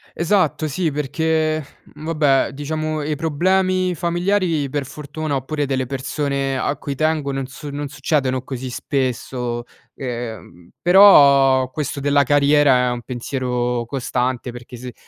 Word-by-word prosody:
Esatto 165 Hz, -4 st, +1 dB
sì, 160 Hz, +2 st, -1 dB
perché 155 Hz, +2 st, 0 dB, 0.2 s
vabbè, 150 Hz, -3 st, 0 dB
diciamo 155 Hz, +1 st, -3 dB
i 150 Hz, 0 st, -2 dB
problemi 185 Hz, +4 st, +1 dB
familiari 175 Hz, -2 st, 0 dB
per 140 Hz, -1 st, -2 dB
fortuna 150 Hz, +1 st, -5 dB
oppure 145 Hz, +2 st, -2 dB
delle 130 Hz, -1 st, -1 dB
persone 135 Hz, +1 st, -2 dB
a 140 Hz, +3 st, -1 dB
cui 140 Hz, -1 st, -5 dB
tengo 155 Hz, -1 st, 0 dB
non 135 Hz, -1 st, -3 dB
su 145 Hz, +2 st, -9 dB
non 145 Hz, 0 st, -4 dB
succedono 135 Hz, -3 st, -1 dB
così 130 Hz, -1 st, -6 dB
spesso. 125 Hz, -3 st, -2 dB, 0.3 s
Ehm, 115 Hz, -9 st, -7 dB
però 140 Hz, -9 st, +6 dB
questo 145 Hz, -1 st, -4 dB
della 145 Hz, 0 st, +3 dB
carriera 140 Hz, -2 st, +4 dB
è -, -, 0 dB
un 120 Hz, -1 st, -4 dB
pensiero 125 Hz, -1 st, -2 dB
costante 125 Hz, 0 st, -2 dB
perché 120 Hz, 0 st, -10 dB
se 125 Hz, 0 st, -8 dB
140 Hz, 130 wpm, -20 LUFS, 130-155 Hz, 0.3 s, però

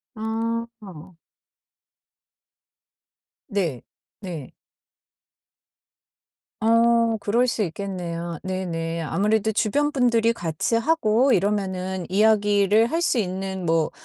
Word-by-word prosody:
아. 220 Hz, -5 st, -5 dB, 2.3 s
네. 175 Hz, -, -2 dB, 0.4 s
네. 165 Hz, -8 st, -7 dB, 2.1 s
어 230 Hz, 0 st, +3 dB
그럴 235 Hz, +5 st, +1 dB
수 235 Hz, -2 st, -1 dB
있겠네요. 170 Hz, -2 st, -5 dB
네네. 170 Hz, -3 st, -3 dB
아무래도 210 Hz, +6 st, +1 dB
주변 285 Hz, +8 st, +1 dB
분들이 235 Hz, -4 st, +2 dB
같이 175 Hz, +3 st, -2 dB
하고 255 Hz, -2 st, +2 dB
이러면은 190 Hz, -2 st, -1 dB
이야기를 205 Hz, +1 st, +3 dB
할 330 Hz, +2 st, -1 dB
수 260 Hz, -, +1 dB
있는 190 Hz, -2 st, -3 dB
뭐, 165 Hz, -1 st, +1 dB
205 Hz, 165 characters per minute, -23 LUFS, 180-230 Hz, 2.3 s, 어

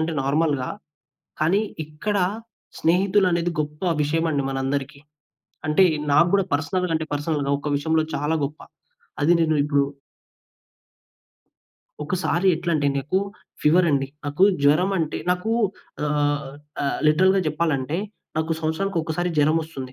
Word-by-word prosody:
అంటే, 160 Hz, +1 st, -1 dB
నార్మల్‌గా. 140 Hz, -1 st, 0 dB, 0.7 s
కానీ, 195 Hz, +7 st, +3 dB, 0.2 s
ఇక్కడ 155 Hz, +7 st, -3 dB, 0.6 s
స్నేహితులనేది 180 Hz, -1 st, +2 dB
గొప్పవిషయమండి 150 Hz, -1 st, 0 dB
మనందరికీ. 135 Hz, +2 st, -3 dB, 0.7 s
అంటే, 155 Hz, +5 st, +5 dB, 0.3 s
నా‌కు 170 Hz, +4 st, +5 dB
గూడా 195 Hz, -2 st, +2 dB
పర్సనల్‌గా 165 Hz, +3 st, 0 dB
అంటే 160 Hz, 0 st, -5 dB
పర్సనల్‌గా, 145 Hz, -1 st, -1 dB
ఒక 150 Hz, -, -4 dB
విషయంలో 160 Hz, +2 st, +1 dB
చాలా 150 Hz, +3 st, 0 dB
గొప్ప 150 Hz, +2 st, -8 dB, 0.6 s
అది 165 Hz, +4 st, +5 dB
నేను 160 Hz, -1 st, +2 dB
ఇప్పుడు 145 Hz, -1 st, +2 dB, 2.2 s
ఒకసారి 180 Hz, +2 st, 0 dB
ఎట్లంటే, 165 Hz, -4 st, 0 dB
నాకు 145 Hz, +8 st, 0 dB, 0.4 s
ఫీవరండి. 150 Hz, -4 st, +3 dB, 0.2 s
నాకు 145 Hz, +6 st, -1 dB, 0.2 s
జ్వరమంటే 160 Hz, +2 st, +2 dB
నాకు 180 Hz, +5 st, -1 dB, 0.6 s
ఆహ్, 145 Hz, -2 st, 0 dB, 0.3 s
ఆహ్, 140 Hz, -, -1 dB
లిటరల్‌గా 190 Hz, +5 st, +4 dB
జెప్పాలంటే, 155 Hz, 0 st, -1 dB, 0.4 s
నాకు 160 Hz, +1 st, 0 dB
సంవత్సరానికొకసారి 165 Hz, 0 st, -1 dB
జరమొస్తుంది. 150 Hz, -3 st, 0 dB
155 Hz, 100 wpm, -23 LUFS, 145-175 Hz, 2.2 s, అంటే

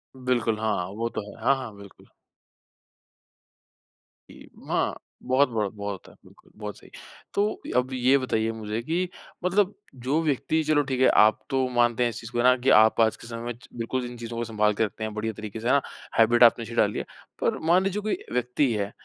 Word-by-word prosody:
बिल्कुल 120 Hz, -4 st, 0 dB
हाँ 110 Hz, -1 st, 0 dB, 0.2 s
वो 115 Hz, +1 st, -1 dB
तो 110 Hz, -, -1 dB
है। 110 Hz, -, -13 dB
हाँ, 135 Hz, +2 st, +4 dB
हाँ, 125 Hz, -5 st, -7 dB
बिलकुल। 100 Hz, -1 st, -15 dB, 2.2 s
इ -, -, -14 dB, 0.2 s
म -, -, -16 dB
हाँ, -, -, 0 dB, 0.3 s
बहुत, 130 Hz, +1 st, +3 dB
बहुत, 105 Hz, -4 st, -2 dB
बहुत 100 Hz, 0 st, -4 dB
होता 95 Hz, -, -12 dB
है, -, -, -21 dB
बिल्कुल -, -, -21 dB
बहुत 105 Hz, -1 st, -5 dB
सही। -, -, -17 dB, 0.4 s
तो 210 Hz, +1 st, 0 dB, 0.2 s
अब 130 Hz, +1 st, -3 dB
ये 130 Hz, +2 st, +4 dB
बताइए 115 Hz, -4 st, 0 dB
मुझे 110 Hz, 0 st, -4 dB
कि 175 Hz, +5 st, -1 dB, 0.4 s
मतलब 195 Hz, +2 st, +2 dB, 0.3 s
जो 150 Hz, +5 st, +2 dB
व्यक्ति 155 Hz, +2 st, 0 dB
चलो 150 Hz, -1 st, +3 dB
ठीक 130 Hz, -1 st, -1 dB
है, 130 Hz, -, +6 dB
आप 110 Hz, +1 st, +5 dB
तो 130 Hz, -1 st, +1 dB
मानते 120 Hz, 0 st, +3 dB
हैं 120 Hz, -, +2 dB
इस -, -, -6 dB
चीज़ 115 Hz, +1 st, -9 dB
को, -, -, -4 dB
है 120 Hz, -, +2 dB
ना, 125 Hz, 0 st, +6 dB
कि 130 Hz, +2 st, 0 dB
आप 110 Hz, +1 st, +4 dB
आज 110 Hz, -1 st, +3 dB
के -, -, -12 dB
समय 115 Hz, -1 st, -6 dB
में 120 Hz, -, -3 dB
च -, -, -17 dB
बिल्कुल 120 Hz, +2 st, -3 dB
इन 120 Hz, 0 st, -8 dB
चीजों 115 Hz, 0 st, -6 dB
को 120 Hz, -, -1 dB
सँभाल 105 Hz, -2 st, +1 dB
के 110 Hz, -, +1 dB
रखते 110 Hz, -, -7 dB
हैं, 110 Hz, -1 st, -3 dB
बढ़िया 110 Hz, +1 st, -3 dB
तरीक़े 110 Hz, +1 st, -7 dB
से। 115 Hz, -, -4 dB
है 130 Hz, -, +4 dB
ना? 140 Hz, -, +4 dB, 0.4 s
हैबिट 120 Hz, +2 st, +6 dB
आपने 115 Hz, 0 st, +6 dB
अच्छी 115 Hz, -, -8 dB
डाली 105 Hz, -3 st, +2 dB
है। -, -, -5 dB, 0.4 s
पर -, -, +1 dB
मान 180 Hz, +3 st, +5 dB
लीजिए 195 Hz, +2 st, -1 dB
कोई 215 Hz, +1 st, -1 dB, 0.2 s
व्यक्ति 125 Hz, +2 st, +1 dB
है 100 Hz, -1 st, -2 dB
120 Hz, 225 wpm, -26 LUFS, 110-130 Hz, 2.2 s, है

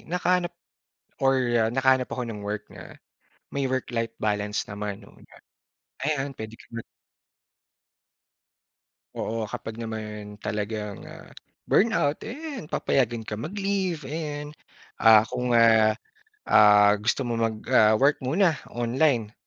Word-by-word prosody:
nakahanap 180 Hz, 0 st, +1 dB, 0.8 s
or, 135 Hz, 0 st, +4 dB, 0.2 s
ah, 110 Hz, -1 st, +2 dB
nakahanap 130 Hz, 0 st, +2 dB
ako 125 Hz, -, -3 dB
ng 105 Hz, -2 st, -6 dB
work 105 Hz, 0 st, -4 dB
na -, -, -12 dB, 0.6 s
may 140 Hz, -1 st, 0 dB
work 130 Hz, -1 st, -2 dB
life 115 Hz, -1 st, -1 dB
balance 105 Hz, -1 st, -1 dB
naman 105 Hz, 0 st, -5 dB
'no. 100 Hz, -, -17 dB
Kumbaga, -, -, -18 dB, 0.7 s
ayan, 140 Hz, -2 st, -1 dB
pwede 110 Hz, 0 st, -7 dB
ka -, -, -17 dB
mag 115 Hz, 0 st, -6 dB, 2.3 s
Oo. 115 Hz, 0 st, -3 dB
Kapag 110 Hz, -, -6 dB
naman 105 Hz, -2 st, -7 dB
talagang, 105 Hz, -1 st, -4 dB
ah, -, -, -12 dB, 0.4 s
burnout, 155 Hz, -9 st, +2 dB
eh, -, -, -6 dB, 0.2 s
'yan 155 Hz, -, -9 dB
papayagan 120 Hz, -4 st, 0 dB
ka 105 Hz, -, -3 dB
mag-leave, 190 Hz, -, -2 dB
ayan. 150 Hz, 0 st, -5 dB, 0.4 s
Ah, 110 Hz, 0 st, +6 dB
kung, 125 Hz, 0 st, -2 dB
ah, 115 Hz, -2 st, +5 dB, 0.5 s
ah, 105 Hz, -1 st, +6 dB
gusto 120 Hz, +5 st, 0 dB
mo 120 Hz, -, -2 dB
mag, 115 Hz, -1 st, 0 dB, 0.2 s
ah, 110 Hz, 0 st, +6 dB
work 140 Hz, +6 st, +3 dB
muna 165 Hz, +7 st, +2 dB, 0.2 s
online 120 Hz, -1 st, 0 dB
115 Hz, 130 wpm, -25 LUFS, 110-145 Hz, 2.3 s, Ah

